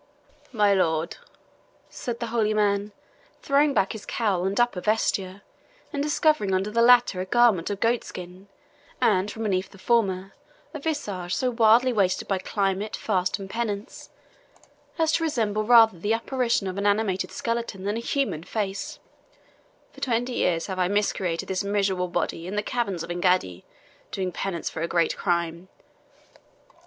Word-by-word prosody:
"My 210 Hz, -4 st, +3 dB
lord," 165 Hz, -3 st, 0 dB, 0.7 s
said 235 Hz, -1 st, -6 dB
the 235 Hz, -, -2 dB
holy 215 Hz, -2 st, +1 dB
man, 205 Hz, 0 st, +1 dB, 0.5 s
throwing 285 Hz, +1 st, +3 dB
back 195 Hz, -, +2 dB
his 220 Hz, -2 st, -7 dB
cowl 195 Hz, -6 st, -1 dB
and 195 Hz, +3 st, -1 dB
upper 240 Hz, -6 st, +1 dB
vesture, 200 Hz, -2 st, -1 dB, 0.5 s
and 285 Hz, -, -1 dB
discovering 295 Hz, -9 st, +2 dB
under 195 Hz, +3 st, -1 dB
the 230 Hz, +2 st, +2 dB
latter 240 Hz, -6 st, +5 dB
a -, -, -3 dB
garment 230 Hz, -7 st, +3 dB
of 200 Hz, -1 st, -3 dB
goatskin, 190 Hz, -5 st, -3 dB, 0.5 s
and 195 Hz, -1 st, +2 dB
from 225 Hz, -, -6 dB
beneath 195 Hz, -2 st, -1 dB
the -, -, -16 dB
former 195 Hz, -3 st, 0 dB, 0.4 s
a 305 Hz, -, -5 dB
visage 205 Hz, -, -3 dB
so 255 Hz, -1 st, 0 dB
wildly 235 Hz, +2 st, +4 dB
wasted 195 Hz, -4 st, +1 dB
by 195 Hz, -1 st, 0 dB
climate, 195 Hz, +2 st, -1 dB
fast, 185 Hz, -4 st, 0 dB
and 195 Hz, -, -8 dB
penance, 210 Hz, -1 st, -4 dB, 0.9 s
as 320 Hz, -1 st, +2 dB
to 330 Hz, -, +1 dB
resemble 215 Hz, -8 st, 0 dB
rather 225 Hz, -5 st, +6 dB
the 205 Hz, +6 st, 0 dB
apparition 235 Hz, -2 st, 0 dB
of 190 Hz, +1 st, -3 dB
an 200 Hz, -, +1 dB
animated 200 Hz, -2 st, 0 dB
skeleton 230 Hz, -5 st, -3 dB
than 205 Hz, +2 st, -1 dB
a -, -, -2 dB
human 240 Hz, -, -1 dB
face, 210 Hz, -, -4 dB, 1.0 s
"for -, -, -15 dB
twenty 245 Hz, 0 st, 0 dB
years 170 Hz, -7 st, 0 dB
have 190 Hz, -2 st, -5 dB
I 180 Hz, -, +2 dB
macerated 195 Hz, -4 st, -1 dB
this 190 Hz, +1 st, -1 dB
miserable 195 Hz, -2 st, 0 dB
body 170 Hz, -1 st, -3 dB
in 195 Hz, -, -5 dB
the 210 Hz, -, 0 dB
caverns 205 Hz, -8 st, -2 dB
of 170 Hz, -, -6 dB
Engaddi, 175 Hz, -, 0 dB, 0.5 s
doing 185 Hz, -1 st, -2 dB
penance 175 Hz, -1 st, -4 dB
for 160 Hz, -, -4 dB
a 165 Hz, -, 0 dB
great 170 Hz, -1 st, +1 dB
crime. 170 Hz, -1 st, -1 dB
200 Hz, 160 wpm, -25 LUFS, 185-230 Hz, 1.0 s, rather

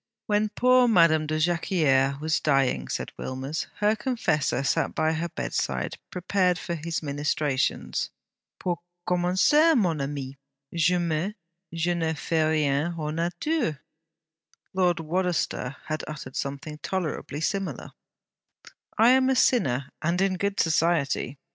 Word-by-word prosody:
'When 210 Hz, 0 st, +1 dB
poor 250 Hz, +3 st, +4 dB
Madame 165 Hz, -7 st, +4 dB
de 155 Hz, 0 st, -1 dB
Jacquieres 155 Hz, -5 st, +2 dB
was 155 Hz, +1 st, 0 dB
dying,' 135 Hz, -3 st, +1 dB
said -, -, -4 dB
Wilmers, 135 Hz, +3 st, -4 dB
'her 210 Hz, +1 st, +2 dB
confessor 210 Hz, -, 0 dB
sat 135 Hz, -, 0 dB
by 155 Hz, 0 st, +2 dB
her 165 Hz, +2 st, -2 dB
bedside, 65 Hz, -, -3 dB
prepared 180 Hz, 0 st, +1 dB
for 170 Hz, -, -4 dB
his 165 Hz, 0 st, -3 dB
ministrations. 145 Hz, -2 st, -1 dB, 0.5 s
"Pour 175 Hz, -2 st, -2 dB, 0.3 s
commencer, 185 Hz, -, +4 dB
mon 170 Hz, -9 st, +1 dB
ami, 135 Hz, -1 st, -5 dB, 0.3 s
jamais 170 Hz, +2 st, +1 dB, 0.4 s
je 170 Hz, +1 st, 0 dB
n'ai 165 Hz, -2 st, -1 dB
fait 160 Hz, +1 st, 0 dB
rien 150 Hz, +1 st, +1 dB
hors 150 Hz, -1 st, -3 dB
nature."' 175 Hz, -, -1 dB, 0.9 s
Lord 180 Hz, -2 st, +2 dB
Wadaster 165 Hz, -5 st, -1 dB
had 155 Hz, 0 st, -3 dB
uttered 150 Hz, -4 st, -7 dB
something 140 Hz, +2 st, -4 dB
tolerably 155 Hz, -1 st, -3 dB
similar: 195 Hz, +4 st, -3 dB, 1.1 s
'I 225 Hz, +2 st, +6 dB
am 260 Hz, 0 st, +4 dB
a 265 Hz, -, +3 dB
sinner, 140 Hz, -, +2 dB
and 170 Hz, +3 st, 0 dB
in 195 Hz, 0 st, +2 dB
good 200 Hz, +1 st, -1 dB
society.' 160 Hz, -4 st, +1 dB
165 Hz, 125 wpm, -26 LUFS, 145-185 Hz, 1.1 s, I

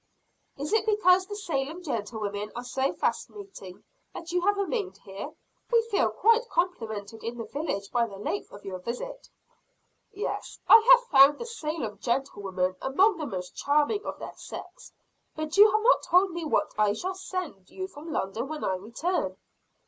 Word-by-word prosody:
"Is 290 Hz, +8 st, -3 dB
it 440 Hz, 0 st, +2 dB
because 375 Hz, -3 st, +4 dB
the 410 Hz, -, -5 dB
Salem 330 Hz, -3 st, -3 dB
gentlewomen 210 Hz, -, -3 dB
are 240 Hz, -, -4 dB
so 265 Hz, +2 st, 0 dB
fascinating 390 Hz, -, -4 dB, 0.3 s
that 335 Hz, 0 st, -7 dB
you 355 Hz, 0 st, +1 dB
have 405 Hz, +3 st, +2 dB
remained 400 Hz, -1 st, -2 dB
here? 195 Hz, 0 st, -8 dB, 0.4 s
We 465 Hz, -1 st, +5 dB
feel 400 Hz, -, +3 dB
quite 460 Hz, +2 st, +3 dB
complimented 225 Hz, -, -2 dB
in 235 Hz, +1 st, -4 dB
the 230 Hz, -, -4 dB
village 210 Hz, -6 st, -4 dB
by 235 Hz, -1 st, +2 dB
the 200 Hz, -3 st, -10 dB
length 205 Hz, 0 st, -4 dB
of 205 Hz, -, -12 dB
your 185 Hz, -2 st, -5 dB
visit." 250 Hz, -, -6 dB, 0.8 s
"Yes, 415 Hz, -, -4 dB
I 450 Hz, -, +10 dB
have -, -, +7 dB
found 275 Hz, +2 st, +8 dB
the 475 Hz, -, -6 dB
Salem 315 Hz, -, -4 dB
gentlewomen 195 Hz, -8 st, -1 dB
among 375 Hz, +9 st, +3 dB
the 305 Hz, -3 st, -4 dB
most 180 Hz, -4 st, -6 dB
charming 300 Hz, +9 st, +1 dB
of -, -, -5 dB
their -, -, -8 dB
sex. -, -, -10 dB, 0.4 s
But 310 Hz, 0 st, -4 dB
you 420 Hz, +1 st, +9 dB
have 430 Hz, +1 st, +2 dB
not -, -, +5 dB
told 365 Hz, +2 st, +3 dB
me 340 Hz, -1 st, -4 dB
what 300 Hz, -, +1 dB
I 210 Hz, -1 st, +4 dB
shall 370 Hz, -, -3 dB
send 365 Hz, -, -6 dB
you 375 Hz, 0 st, -5 dB
from 325 Hz, -3 st, -10 dB
London 220 Hz, +1 st, -2 dB
when 310 Hz, +1 st, -5 dB
I 190 Hz, -, +1 dB
return?" 235 Hz, -, -2 dB
300 Hz, 170 wpm, -27 LUFS, -, 0.8 s, I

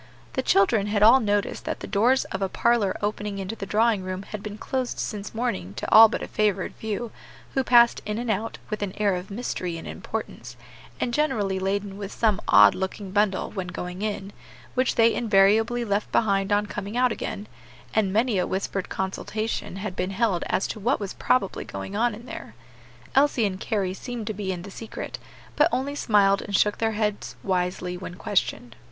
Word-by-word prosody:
The 260 Hz, -, 0 dB
children 200 Hz, -2 st, +3 dB
had 210 Hz, 0 st, +1 dB
all 235 Hz, +5 st, +8 dB
noticed 205 Hz, -3 st, -1 dB
that -, -, -3 dB
the -, -, -4 dB
doors 235 Hz, +6 st, +2 dB
of 190 Hz, -, -3 dB
a 195 Hz, -, 0 dB
parlor 230 Hz, -4 st, +2 dB
opening 205 Hz, -1 st, -2 dB
into 195 Hz, +3 st, -4 dB
the 195 Hz, -2 st, -6 dB
drawing 220 Hz, 0 st, +2 dB
room 185 Hz, +1 st, -5 dB
had 210 Hz, 0 st, -7 dB
been 210 Hz, 0 st, -7 dB
closed 255 Hz, +2 st, -3 dB
since 210 Hz, 0 st, -5 dB
morning 100 Hz, -, -2 dB
to 115 Hz, -, -4 dB
all 220 Hz, 0 st, +10 dB
but -, -, -3 dB
a -, -, -5 dB
favored 205 Hz, -3 st, 0 dB
few, 220 Hz, +1 st, -4 dB, 0.4 s
who 265 Hz, -, +1 dB
passed 240 Hz, -1 st, +5 dB
in 210 Hz, 0 st, -3 dB
and 235 Hz, -1 st, -1 dB
out, 220 Hz, +2 st, -2 dB
with 215 Hz, -, -3 dB
an 200 Hz, -2 st, -2 dB
air 205 Hz, -2 st, +2 dB
of 180 Hz, +1 st, -6 dB
mystery 190 Hz, -5 st, -3 dB
and 165 Hz, -, -8 dB
importance, 125 Hz, -, -6 dB, 0.4 s
and 240 Hz, -, -1 dB
generally 210 Hz, -11 st, 0 dB
laden 195 Hz, +1 st, -2 dB
with 200 Hz, 0 st, -5 dB
some 215 Hz, -3 st, +1 dB
odd -, -, +8 dB
looking 190 Hz, +1 st, -4 dB
bundle 205 Hz, -1 st, +1 dB
when 190 Hz, -3 st, -4 dB
going 180 Hz, +1 st, -6 dB
in, 205 Hz, -2 st, -3 dB, 0.4 s
which 255 Hz, 0 st, +1 dB
they 230 Hz, 0 st, +5 dB
invariably 225 Hz, +2 st, +3 dB
left 205 Hz, 0 st, -1 dB
behind 195 Hz, -3 st, +2 dB
on 205 Hz, 0 st, +3 dB
coming 205 Hz, +2 st, -5 dB
out 250 Hz, -1 st, +3 dB
again, 205 Hz, -1 st, -4 dB, 0.5 s
and 210 Hz, -3 st, +2 dB
many 220 Hz, 0 st, +2 dB
a -, -, 0 dB
whispered 195 Hz, 0 st, -3 dB
consultation 210 Hz, +2 st, -3 dB
had 195 Hz, -1 st, -5 dB
been 185 Hz, 0 st, -1 dB
held 195 Hz, -3 st, +1 dB
as -, -, 0 dB
to 220 Hz, -, -5 dB
what 240 Hz, +7 st, +1 dB
was 200 Hz, -2 st, -4 dB
probably 225 Hz, -7 st, 0 dB
going 100 Hz, -, -7 dB
on 235 Hz, +1 st, +1 dB
in 230 Hz, +3 st, -12 dB
there. 110 Hz, -, -9 dB, 0.6 s
Elsie 270 Hz, -4 st, +3 dB
and 190 Hz, -2 st, -2 dB
Carry 195 Hz, -4 st, -1 dB
seemed 235 Hz, +2 st, -6 dB
to 215 Hz, -, -2 dB
be 200 Hz, -2 st, -3 dB
in 175 Hz, -2 st, -5 dB
the 200 Hz, -, -9 dB
secret, 220 Hz, +3 st, -7 dB, 0.4 s
but 300 Hz, +3 st, +4 dB
only 275 Hz, +2 st, -1 dB
smiled 200 Hz, -7 st, +3 dB
and 200 Hz, -, -3 dB
shook 210 Hz, +1 st, +2 dB
their 225 Hz, -1 st, +1 dB
heads 210 Hz, -1 st, -2 dB
wisely 180 Hz, -1 st, -1 dB
when 180 Hz, 0 st, -7 dB
questioned. 125 Hz, -, -1 dB
205 Hz, 195 wpm, -25 LUFS, 190-225 Hz, 0.6 s, all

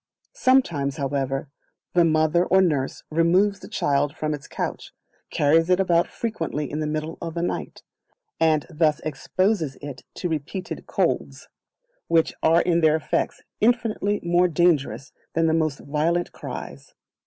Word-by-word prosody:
Sometimes, 170 Hz, -, +2 dB
however, 135 Hz, 0 st, -2 dB, 0.5 s
the 175 Hz, -, +5 dB
Mother 155 Hz, +1 st, +3 dB
or 190 Hz, -, +4 dB
Nurse 150 Hz, -8 st, 0 dB
removes 180 Hz, +5 st, +3 dB
the -, -, -11 dB
child 145 Hz, -7 st, 0 dB
from 155 Hz, 0 st, -1 dB
its 145 Hz, -2 st, -7 dB
couch, -, -, -5 dB, 0.4 s
carries 165 Hz, +4 st, +3 dB
it 180 Hz, 0 st, +4 dB
about 175 Hz, -2 st, +3 dB
frequently 165 Hz, -10 st, -3 dB
in 150 Hz, -, -3 dB
the 155 Hz, -, -1 dB
middle 155 Hz, +1 st, -4 dB
of 165 Hz, -1 st, -5 dB
the 170 Hz, -, -1 dB
night, -, -, -4 dB, 0.6 s
and 155 Hz, -2 st, +3 dB
thus 155 Hz, -2 st, +1 dB
exposes 160 Hz, +1 st, -1 dB
it 140 Hz, -4 st, -8 dB
to 180 Hz, -, -3 dB
repeated 165 Hz, +4 st, -5 dB
colds, -, -, -1 dB, 0.6 s
which 165 Hz, -1 st, +2 dB
are 165 Hz, +2 st, +4 dB
in 170 Hz, -1 st, +2 dB
their 155 Hz, -1 st, +5 dB
effects 160 Hz, -, -2 dB, 0.2 s
infinitely 220 Hz, -3 st, +1 dB
more 175 Hz, +1 st, +3 dB
dangerous 160 Hz, -5 st, +1 dB, 0.2 s
than 165 Hz, 0 st, +3 dB
the 160 Hz, -, +2 dB
most 155 Hz, -3 st, +1 dB
violent 160 Hz, +4 st, 0 dB
cries. -, -, -8 dB
165 Hz, 145 wpm, -24 LUFS, 150-175 Hz, 0.6 s, the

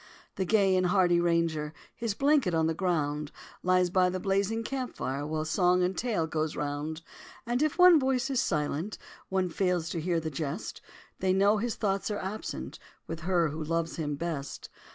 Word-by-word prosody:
The 190 Hz, -, -1 dB
gay 195 Hz, -1 st, +3 dB
and 185 Hz, -1 st, +2 dB
hardy 175 Hz, -2 st, +4 dB
Ranger, 165 Hz, -3 st, 0 dB, 0.2 s
His 230 Hz, -4 st, -2 dB
blanket 275 Hz, -, +3 dB
on 160 Hz, 0 st, +2 dB
the 160 Hz, -, +1 dB
ground, 150 Hz, -4 st, -1 dB, 0.3 s
Lies 180 Hz, -1 st, +2 dB
by 185 Hz, 0 st, +4 dB
the 185 Hz, +1 st, -3 dB
blazing 200 Hz, +4 st, 0 dB
camp 260 Hz, +1 st, -4 dB
fire 140 Hz, +2 st, -3 dB
While 155 Hz, 0 st, -2 dB
song 180 Hz, +2 st, +3 dB
and 185 Hz, +1 st, 0 dB
tale 225 Hz, -9 st, 0 dB
goes 155 Hz, -1 st, -2 dB
round; 150 Hz, +2 st, -3 dB, 0.4 s
And 240 Hz, +2 st, 0 dB
if 310 Hz, 0 st, +1 dB
one 360 Hz, -3 st, +8 dB
voice 265 Hz, 0 st, 0 dB
is 260 Hz, -, +2 dB
silent, 155 Hz, +4 st, -1 dB, 0.3 s
One 190 Hz, -1 st, +1 dB
fails 180 Hz, -2 st, 0 dB
to 165 Hz, -, -3 dB
hear 170 Hz, 0 st, +1 dB
the 160 Hz, -1 st, -4 dB
jest, 150 Hz, +6 st, -4 dB, 0.4 s
They 185 Hz, -1 st, +2 dB
know 200 Hz, +3 st, +4 dB
his 230 Hz, +1 st, -2 dB
thoughts 195 Hz, -1 st, -1 dB
are 210 Hz, -, -2 dB
absent 200 Hz, +3 st, -5 dB, 0.3 s
With 165 Hz, -, -5 dB
her 170 Hz, -1 st, +1 dB
who 155 Hz, +2 st, -4 dB
loves 165 Hz, +1 st, -2 dB
him 150 Hz, -3 st, -2 dB
best. 145 Hz, -3 st, -5 dB
180 Hz, 185 wpm, -29 LUFS, 160-200 Hz, 0.4 s, one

